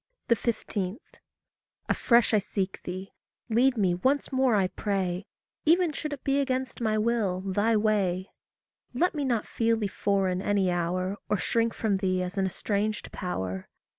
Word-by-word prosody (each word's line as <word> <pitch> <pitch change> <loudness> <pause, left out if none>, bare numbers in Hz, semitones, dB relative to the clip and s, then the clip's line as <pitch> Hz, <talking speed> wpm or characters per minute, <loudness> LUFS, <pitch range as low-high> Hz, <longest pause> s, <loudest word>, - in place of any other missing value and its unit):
15. 210 -3 -2 0.9
Afresh 235 -2 +3
I 215 - +6
seek 195 -1 -3
thee. 185 +2 -6 0.4
Lead 245 +3 +3
me 190 -4 +3
once 265 +13 +1
more 260 -3 +3
I 195 -2 +3
pray 190 -2 -2 0.4
Even 340 +1 +4
should 300 +1 -4
it 280 - -8
be 275 0 +2
against 260 -2 -1
my 215 -1 +1
will, 215 -5 +1
thy 205 +4 +2
way. 200 -4 +1 0.6
Let 355 +8 +2
me 295 -3 -2
not 240 -5 0
feel 230 0 +1
thee 215 - -1
foreign 195 -2 0
any 195 -2 +2
hour, 180 +3 -1
Or 210 - +2
shrink 230 +4 0
from 210 -3 +1
thee 185 -1 0
as 180 +2 -4
an 195 -1 +1
estranged 210 +3 -2
power. 95 - -4
205 Hz, 155 wpm, -28 LUFS, 185-235 Hz, 0.9 s, I